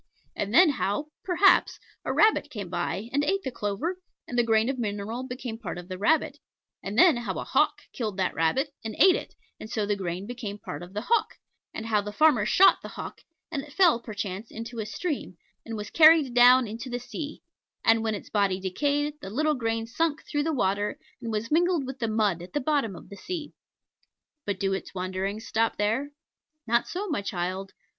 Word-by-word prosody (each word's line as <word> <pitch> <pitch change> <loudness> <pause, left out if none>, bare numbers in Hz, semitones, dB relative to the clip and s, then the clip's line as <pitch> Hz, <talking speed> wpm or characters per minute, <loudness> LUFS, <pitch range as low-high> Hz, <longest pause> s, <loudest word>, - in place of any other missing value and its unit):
And 205 0 -2
then 330 +5 +7
how, 275 +4 -2
perhaps, 380 +1 +4 0.3
a - - 0
rabbit 430 -9 +3
came 205 -9 -6
by, 200 +4 -2
and 285 +1 +2
ate 390 +5 0
the 260 - -3
clover, 240 - -2 0.3
and 245 - -5
the 240 - +5
grain 225 0 +3
of 265 -1 -2
mineral 220 +3 -3
became 245 -3 -6
part 180 -7 -5
of 175 +1 -9
the 185 - -5
rabbit; 315 +10 +2 0.4
and 200 +3 -5
then 335 -3 +7
how 240 - -3
a - - -3
hawk - - +1
killed 215 -5 -3
that 190 - 0
rabbit, 265 - +1
and 220 -1 -5
ate 375 -2 +7
it, - - -6 0.2
and 215 - -8
so 220 -2 -1
the 205 0 0
grain 185 -1 -4
became 225 -3 -6
part - - -7
of 175 +2 -10
the 210 - -1
hawk; 465 -2 +1 0.4
and 220 - -6
how 215 -2 +2
the 210 +1 -6
farmer 250 -4 +4
shot 385 - +6
the - - -7
hawk, - - -8 0.3
and 290 -4 -2
it 290 0 -13
fell 340 -8 +5
perchance 210 -2 -5
into 230 +1 -7
a 215 - -3
stream, 290 - -4 0.3
and 225 -1 -4
was 210 0 -6
carried 310 -5 +6
down 245 0 +7
into 230 +4 -6
the 245 - -2
sea; 285 +5 -7 0.4
and 225 0 +5
when 220 -1 0
its 200 - -9
body 200 -3 +1
decayed, 285 +10 0
the 190 - -7
little 305 +8 +1
grain 225 -4 -1
sank 310 +6 -1
through 290 - -1
the 320 +2 0
water, 205 -6 0 0.2
and 230 - -4
was 215 +3 -3
mingled 340 -2 +2
with 260 0 -7
the 230 - 0
mud 210 -6 +1
at 175 - -11
the 295 - +1
bottom 280 -8 0
of - - -12
the 200 - -9
sea. 325 - -6 0.9
But 200 -2 -2
do 195 0 0
its 195 - -5
wanderings 190 +3 -3
stop 225 +1 0
there? 225 +7 0 0.6
Not 235 +1 +2
so, 390 +4 -4
my 300 - -1
child. 190 0 -3
230 Hz, 210 wpm, -27 LUFS, 205-290 Hz, 0.9 s, then